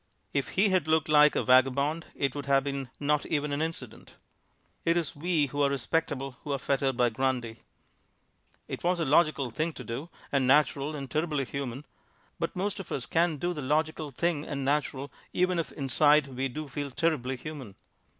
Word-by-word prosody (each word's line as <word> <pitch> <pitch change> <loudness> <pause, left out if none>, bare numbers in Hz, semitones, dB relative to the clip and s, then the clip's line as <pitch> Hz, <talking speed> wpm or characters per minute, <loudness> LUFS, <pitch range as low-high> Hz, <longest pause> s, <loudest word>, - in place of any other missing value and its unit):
If - - 0
he 200 +2 +5
had 185 -5 +2
looked 160 -1 +2
like 150 0 +6
a - - +1
vagabond 140 +5 +3
it 140 -2 0
would 145 -2 -6
have 135 -1 +4
been 140 -2 -3
not 150 0 +1
even 150 -1 -1
an 145 - -1
incident. 160 -8 -5 0.7
It 170 +1 +2
is 165 -4 -2
we 160 0 +1
who 145 +2 -3
are 140 - +4
respectable 140 -1 -1
who 145 - -4
are - - 0
fettered 135 -1 0
by 125 -1 +4
Grundy. 120 -2 -1 1.1
It - - -6
was 175 0 +2
a 165 - +1
logical 145 -3 +3
thing 155 +7 -1
to 125 - -8
do 125 +8 -5 0.2
and 135 -2 +2
natural 145 +1 +3
and 140 -2 -5
terribly 150 -2 -1
human, 135 +1 -5 0.5
but - - -2
most 200 +2 -2
of 195 - -8
us 125 - -2
can't 165 -2 +1
do 175 +3 -1
the 150 - -5
logical 155 +2 0
thing 150 +2 -1
and 140 -3 -4
natural 140 -1 -1 0.2
even 180 -1 +2
if 165 - -3
inside 145 +1 +3
we 130 +1 -2
do 150 +4 -6
feel 140 +1 -4
terribly 135 -3 0
human. 135 -8 -8
145 Hz, 190 wpm, -29 LUFS, 135-155 Hz, 1.1 s, like